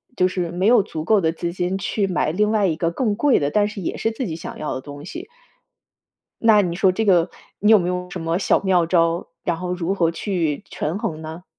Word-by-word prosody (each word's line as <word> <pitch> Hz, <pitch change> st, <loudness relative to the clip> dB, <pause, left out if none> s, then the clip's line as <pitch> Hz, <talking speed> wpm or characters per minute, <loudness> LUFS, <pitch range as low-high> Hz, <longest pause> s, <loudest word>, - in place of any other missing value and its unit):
就 185 Hz, -, +3 dB
是 180 Hz, -2 st, -3 dB
没 180 Hz, +3 st, 0 dB
有 235 Hz, -3 st, +5 dB
足 155 Hz, -4 st, -6 dB
够 210 Hz, +5 st, +3 dB
的 160 Hz, -3 st, +1 dB
资 170 Hz, +1 st, -3 dB
金 180 Hz, +1 st, -2 dB
去 195 Hz, +1 st, -1 dB
买 180 Hz, -4 st, 0 dB
另 210 Hz, +5 st, +1 dB
外 210 Hz, -3 st, +2 dB
一 165 Hz, -, 0 dB
个 165 Hz, 0 st, 0 dB
更 215 Hz, +3 st, 0 dB
贵 270 Hz, +4 st, +3 dB
的， 140 Hz, -, 0 dB
但 205 Hz, +3 st, +2 dB
是 210 Hz, -1 st, -7 dB
也 170 Hz, -, -3 dB
是 225 Hz, -, 0 dB
自 235 Hz, +3 st, -4 dB
己 160 Hz, -, -4 dB
想 -, -, -8 dB
要 155 Hz, -, -3 dB
的 -, -, -4 dB
东 145 Hz, +1 st, -10 dB
西。 335 Hz, -, -8 dB, 1.1 s
那 220 Hz, -2 st, +5 dB
你 175 Hz, -2 st, -2 dB
说 190 Hz, 0 st, +3 dB
这 220 Hz, +4 st, -1 dB
个 180 Hz, -4 st, +3 dB, 0.3 s
你 210 Hz, +2 st, +5 dB
有 220 Hz, -, +8 dB
没 175 Hz, -2 st, -1 dB
有 180 Hz, 0 st, -3 dB
什 180 Hz, -, -5 dB
么 165 Hz, +1 st, -1 dB
小 -, -, +2 dB
妙 185 Hz, -3 st, +2 dB
招， 170 Hz, 0 st, +1 dB, 0.2 s
然 170 Hz, -, 0 dB
后 180 Hz, +1 st, -4 dB
如 180 Hz, +1 st, -1 dB
何 170 Hz, -4 st, +2 dB
去 165 Hz, -4 st, -2 dB
权 160 Hz, +6 st, -3 dB
衡 185 Hz, -9 st, -4 dB
呢？ 160 Hz, +3 st, -8 dB
180 Hz, 265 characters per minute, -21 LUFS, 165-205 Hz, 1.1 s, 有